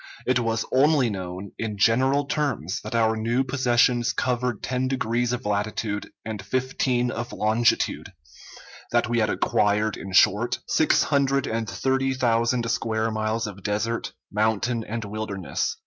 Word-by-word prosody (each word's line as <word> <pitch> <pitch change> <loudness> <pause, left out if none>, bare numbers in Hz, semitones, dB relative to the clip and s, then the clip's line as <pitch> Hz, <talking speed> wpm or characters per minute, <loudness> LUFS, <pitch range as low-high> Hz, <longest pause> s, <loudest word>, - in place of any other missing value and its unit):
It 130 0 +2
was 115 -1 -1
only 135 -2 +4
known, 95 0 -6
in 110 -2 -3
general 130 +7 +3
terms, 140 - -2
that 110 +2 -5
our 110 -1 +3
new 115 +4 0
possessions 125 -1 +2
covered 125 -3 -1
ten 130 0 -1
degrees 120 -2 0
of 125 -2 -3
latitude 105 0 -2 0.2
and 110 -3 -4
fifteen 125 +2 0
of 120 +1 -5
longitude; 110 +2 +1 0.8
that - - +2
we 120 0 +1
had 110 -1 +2
acquired, 105 +1 +1
in 95 - -8
short, 105 +5 +4
six 155 - +3
hundred 140 -1 +1
and 115 0 -2
thirty 135 +1 0
thousand 115 -1 +1
square 110 0 -1
miles 110 +1 -1
of 100 -2 -7
desert, 105 +4 -2 0.2
mountain, 110 +3 0
and 110 0 -5
wilderness. 100 -3 -3
115 Hz, 145 wpm, -25 LUFS, 105-125 Hz, 0.8 s, only